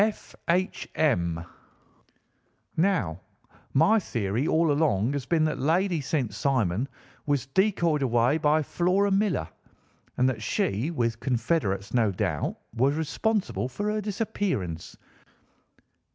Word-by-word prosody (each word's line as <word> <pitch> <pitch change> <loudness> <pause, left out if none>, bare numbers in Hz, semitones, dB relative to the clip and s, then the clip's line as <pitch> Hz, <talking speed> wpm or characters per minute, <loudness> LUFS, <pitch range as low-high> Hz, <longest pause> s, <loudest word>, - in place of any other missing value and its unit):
F. 215 0 -3
H. 180 +2 0
M.' 85 - +1 1.3
Now 155 - +1 0.5
my 205 +11 +5
theory 115 - -1
all 160 -1 +3
along 140 -6 +2
has 140 -2 -3
been 165 -2 +2
that 155 - -1
Lady 170 +3 +1
St. 135 -4 -1
Simon 125 -4 0 0.4
was 140 -3 +1
decoyed 170 -1 +1
away 125 +3 +2
by 150 +1 +3
Flora 185 +6 +1
Millar, 200 0 +1 0.7
and 125 - +3
that 125 -4 -1
she, 105 +5 0
with 115 -8 -1
confederates, 115 - -1
no 115 -4 +3
doubt, 90 -6 -1 0.2
was 135 +5 +2
responsible 185 - -1
for 205 +12 -2
her 215 0 -1
disappearance. 195 - -3
145 Hz, 120 wpm, -27 LUFS, 115-175 Hz, 1.3 s, my